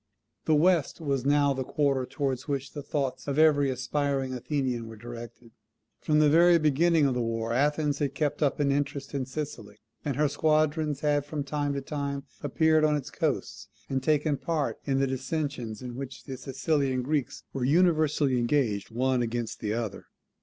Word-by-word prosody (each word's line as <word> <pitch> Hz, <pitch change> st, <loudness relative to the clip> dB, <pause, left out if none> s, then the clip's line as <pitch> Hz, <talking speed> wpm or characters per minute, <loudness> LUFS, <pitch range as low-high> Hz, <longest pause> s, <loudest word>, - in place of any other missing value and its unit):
The 155 Hz, -, +4 dB
West 170 Hz, 0 st, +2 dB
was 140 Hz, -4 st, -1 dB
now 145 Hz, -1 st, +4 dB
the 130 Hz, 0 st, -3 dB
quarter 135 Hz, -2 st, 0 dB
towards 135 Hz, -3 st, -2 dB
which 140 Hz, -2 st, -2 dB
the 145 Hz, -, -5 dB
thoughts 140 Hz, -2 st, -3 dB
of 140 Hz, 0 st, -1 dB
every 150 Hz, -3 st, +5 dB
aspiring 135 Hz, +1 st, -1 dB
Athenian 125 Hz, -2 st, -2 dB
were 115 Hz, -, -9 dB
directed. 120 Hz, +1 st, -10 dB, 0.5 s
From 150 Hz, -, +1 dB
the 155 Hz, 0 st, +5 dB
very 170 Hz, +3 st, +6 dB
beginning 155 Hz, +1 st, +3 dB
of 135 Hz, -, +2 dB
the 125 Hz, -, -1 dB
war 115 Hz, 0 st, -2 dB
Athens 145 Hz, +2 st, +1 dB
had 140 Hz, -2 st, -1 dB
kept 150 Hz, 0 st, -1 dB
up 145 Hz, -1 st, +1 dB
an 140 Hz, -1 st, +2 dB
interest 140 Hz, 0 st, -2 dB
in 135 Hz, -3 st, -2 dB
Sicily; 130 Hz, -8 st, -6 dB, 0.3 s
and 140 Hz, -3 st, -2 dB
her 150 Hz, +1 st, +3 dB
squadrons 155 Hz, 0 st, +1 dB
had 145 Hz, -1 st, +2 dB
from 145 Hz, 0 st, -4 dB
time 145 Hz, 0 st, -2 dB
to 140 Hz, -, -2 dB
time 140 Hz, -1 st, -4 dB, 0.2 s
appeared 155 Hz, +2 st, +3 dB
on 150 Hz, -1 st, +3 dB
its 145 Hz, -3 st, -4 dB
coasts -, -, -2 dB, 0.2 s
and 135 Hz, -1 st, 0 dB
taken 150 Hz, +1 st, +1 dB
part 155 Hz, +1 st, -2 dB
in 135 Hz, -1 st, +1 dB
the 135 Hz, -, +3 dB
dissensions 130 Hz, -4 st, -3 dB
in 125 Hz, -1 st, -6 dB
which 130 Hz, 0 st, -7 dB
the 135 Hz, -, -6 dB
Sicilian 135 Hz, 0 st, -1 dB
Greeks 140 Hz, -1 st, -2 dB
were 135 Hz, -, -2 dB
universally 155 Hz, -3 st, +3 dB
engaged 120 Hz, -5 st, 0 dB
one 125 Hz, +2 st, +1 dB
against 120 Hz, -1 st, -3 dB
the 105 Hz, 0 st, -2 dB
other. 110 Hz, -4 st, -4 dB
140 Hz, 180 wpm, -28 LUFS, 130-150 Hz, 0.5 s, very